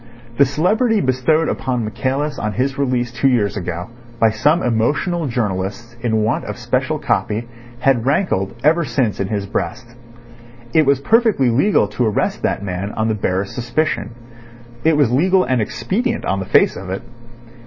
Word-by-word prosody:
The 140 - +6
celebrity 210 - +2
bestowed 130 +4 +2
upon 125 -3 -2
Michaelis 135 +6 -2
on 105 0 -2
his 130 +3 -1
release 125 -3 0
two 125 +3 +1
years 115 -6 +1
ago 90 +2 -5 0.3
by 115 -1 +4
some 150 +10 +2
emotional 145 +8 0
journalists 115 0 -3
in 110 -2 +1
want 110 - 0
of - - -5
special - - -1
copy 110 +3 -1 0.3
had 130 -4 +3
rankled 130 - 0
ever 165 +4 +4
since 125 -8 -1
in 100 - -1
his 100 -1 -2
breast. 120 +4 -3 0.9
It 155 -3 +4
was 140 -1 +4
perfectly 215 - +3
legal 140 - +3
to 115 +3 0
arrest 105 - -1
that - - -1
man 95 +1 -3
on 110 0 -1
the - - +1
barest 95 -2 -2
suspicion. 120 +3 -1 0.7
It 160 -1 +3
was 140 -6 +3
legal 185 +8 +3
and 130 -3 +1
expedient 230 - -2
on 95 - 0
the 95 - -4
face - - +4
of 90 0 -7
it. 95 +5 -4
125 Hz, 165 wpm, -19 LUFS, 105-150 Hz, 0.9 s, The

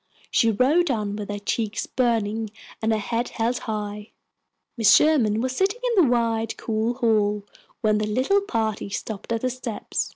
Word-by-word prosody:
She 230 -4 +4
rode 285 +10 +3
on 210 -5 -1
with 205 -1 -6
her 205 - -3
cheeks 210 +1 -2
burning 225 -3 0 0.3
and 220 0 +1
her 220 - +2
head 230 +3 -2
held 235 +2 -1
high. 210 -1 -5 0.6
Mrs. 225 -5 +6
Sherman 235 -9 +3
was 255 +1 -2
sitting 390 - +1 0.2
in 375 - +6
the - - +1
wide, 230 -2 0
cool 225 +2 -1
hall 210 -4 +1 0.4
when 215 -1 +2
the 215 - -1
little 260 - +2
party 220 - -2
stopped 205 +2 -5
at 230 -1 0
the 255 - 0
steps. 245 -3 -4
225 Hz, 170 wpm, -24 LUFS, 210-250 Hz, 0.6 s, Mrs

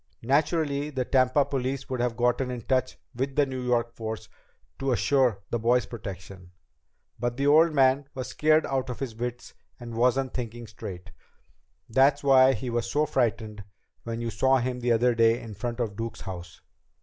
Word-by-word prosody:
Naturally, 145 +2 +1
the 130 -4 -2
Tampa 130 +2 +3
police 135 0 -3
would 130 -1 -3
have 120 -2 -1
gotten 125 +2 +1
in 125 -1 -4
touch 130 +2 0 0.2
with 135 +2 -3
the 145 - +4
New 130 -1 -5
York 120 -1 0
force 110 -1 -6 0.5
to 135 0 0
assure 125 -5 +2
the 120 - 0
boy's 120 +2 +2
protection. 95 -4 -9 0.7
But 120 +1 -2
the 140 - 0
old 160 +3 +6
man 135 -1 +3
was 130 -1 -4
scared 155 +1 +3
out 130 -1 -2
of 125 - -4
his 130 -4 -4
wits 120 +1 -5 0.3
and 120 -1 -8
wasn't 125 +3 +1
thinking 120 -1 -5
straight. 95 -4 -9 0.8
That's 135 +5 +3
why 135 -1 +6
he 130 -2 -4
was 120 0 -1
so 150 +1 +1
frightened 110 -7 -1 0.4
when 115 0 -5
you 115 -1 -3
saw 135 +3 +3
him 125 0 -2
that 120 0 +2
day 115 +1 +4
in 115 -3 -9
front 120 +4 -5
of 110 -4 -2
Duke's 115 +1 -5
house." 90 -3 -8
125 Hz, 175 wpm, -27 LUFS, 115-135 Hz, 0.8 s, old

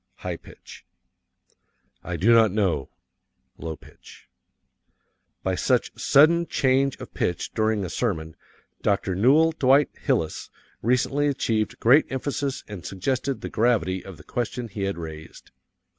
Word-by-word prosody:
(High 90 -3 -5
pitch) - - -14 0.4
| - - -44
| - - -48
| - - -46
I 90 - -4
do 110 +7 +4
not 115 -3 +5
know." 90 -9 0 0.7
(Low 80 -1 -5
pitch) 75 - -17 1.2
By - - 0
such - - +1
sudden 170 +4 +4
change 135 +1 +1
of - - -10
pitch 90 - -2
during 110 -2 0
a - - -5
sermon 80 -9 -2 0.5
Dr. 100 -2 0
Newell 140 - +4
Dwight 140 -2 +3
Hillis 80 -1 -1 0.3
recently 125 +5 +1
achieved 115 -6 -1
great 130 +7 +4
emphasis 135 +1 -3
and 105 -5 -8
suggested 130 +9 -2
the - - -5
gravity 105 -6 +1
of 95 -4 -10
the 75 - -14
question 120 +2 -4
he 100 -1 -3
had 95 -2 -2
raised. 80 -2 -9
110 Hz, 145 wpm, -24 LUFS, 90-130 Hz, 1.2 s, not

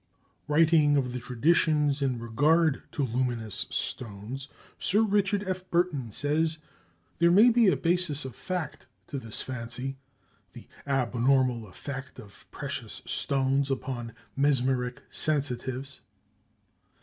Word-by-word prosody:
Writing 150 -1 +4
of 125 -3 0
the 125 - -4
traditions 145 +3 +2
in 130 -3 0
regard 145 +7 +2
to 145 - -1
luminous 120 -3 -2
stones, 120 +4 -4 0.3
Sir 210 +4 +3
Richard 205 -1 +1
F. 185 0 -4
Burton 170 -8 0
says, 155 +6 +1 0.6
"There 170 0 +5
may 210 +8 +7
be 235 -2 +4
a 175 -7 +4
basis 165 -1 0
of 130 - -6
fact 180 - -5 0.2
to 140 - -5
this 115 -4 -2
fancy, 125 +2 -5 0.5
the - - -12 0.2
abnormal 125 -2 +2
effect 130 +8 -8
of 100 -2 -14
precious - - -6
stones 135 0 0
upon 130 -4 -3 0.2
mesmeric 130 -3 +1
sensitives." 135 -2 0
135 Hz, 115 wpm, -28 LUFS, 125-160 Hz, 0.6 s, may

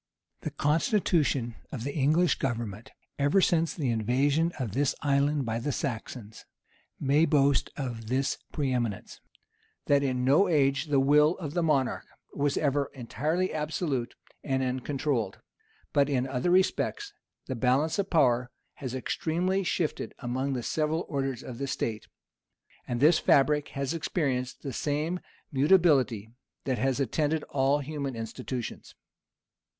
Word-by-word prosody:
The - - -4
constitution 150 - +1
of 115 - -5
the 140 +2 -3
English 155 +4 +2
government, 115 -4 -3 0.3
ever 145 +7 +3
since 165 -3 +2
the 135 -7 0
invasion 140 +9 +1
of 125 -7 -3
this 135 +5 +1
island 140 0 +2
by 115 0 -2
the 145 +5 -2
Saxons, 115 -3 -5 0.6
may 145 +3 +3
boast 140 -4 +3
of 120 -6 -5
this 130 +3 0
pre 140 -4 -1
eminence, 120 -5 -3 0.6
that 140 0 +4
in 130 -2 0
no 145 +9 +5
age 140 -3 +2
the 145 -3 +2
will 150 +4 +4
of 150 -5 -5
the 175 - +1
monarch 145 -6 +1 0.3
was 145 0 0
ever 145 -1 +1
entirely 155 +8 -1
absolute 150 -5 -2 0.3
and 135 -2 0
uncontrolled; 130 -4 -1 0.6
but 140 -1 +3
in 130 -3 +1
other 130 +4 -1
respects 295 - +1 0.3
the 130 - -3
balance 130 - +1
of 200 0 -1
power 125 -6 +3 0.3
has 130 -2 -5
extremely 175 +8 -1
shifted 170 -3 -2
among 130 +2 -2
the 125 -2 -3
several 155 +4 -1
orders 135 -4 -2
of 120 -2 -8
the 140 - -2
state; 110 -4 -3 0.8
and 120 0 -2
this 155 +3 +6
fabric 150 +1 +3
has 140 +2 -1
experienced 135 -6 -2
the 135 - -4
same 155 +7 -1 0.3
mutability 135 - +3 0.3
that 130 -4 -1
has 135 +2 +1
attended 150 +4 0
all 140 +1 +2
human 140 -2 -4
institutions. 115 +2 -6
140 Hz, 140 wpm, -28 LUFS, 125-155 Hz, 0.8 s, this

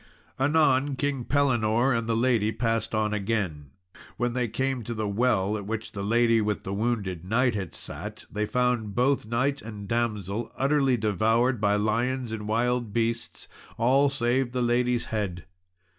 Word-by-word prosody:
Anon 140 -1 +3
King 140 -3 -2
Pellinore 125 -3 +2
and 115 -1 -2
the 115 - +2
lady 115 -3 +2
passed 115 -1 -1
on 105 0 +1
again; 95 -9 -2 0.2
and - - -17 0.2
when 120 +1 0
they 125 -1 0
came 130 +3 -1
to 115 +2 -5
the 110 -1 -2
well 105 -2 +1
at 100 -1 -7
which 110 0 -4
the 100 - -5
lady 115 +2 +3
with 105 -1 -1
the 95 - -4
wounded 100 -5 -2
knight 120 +5 +2
had 95 -5 -4
sat, - - -7
they 105 0 -1
found 125 -4 0
both 125 -2 +2
knight 130 +5 0
and 105 -2 -8
Damsel 110 -2 -2
utterly 135 -2 +2
devoured 110 +3 +1
by 100 -1 +3
lions 115 +4 0
and 105 -2 -5
wild 120 +1 0
beasts, 115 +1 -2 0.3
all 135 +5 +4
save 125 -1 0
the 125 -1 0
lady's 120 0 +1
head. 95 -5 -2
115 Hz, 165 wpm, -26 LUFS, 105-125 Hz, 0.3 s, all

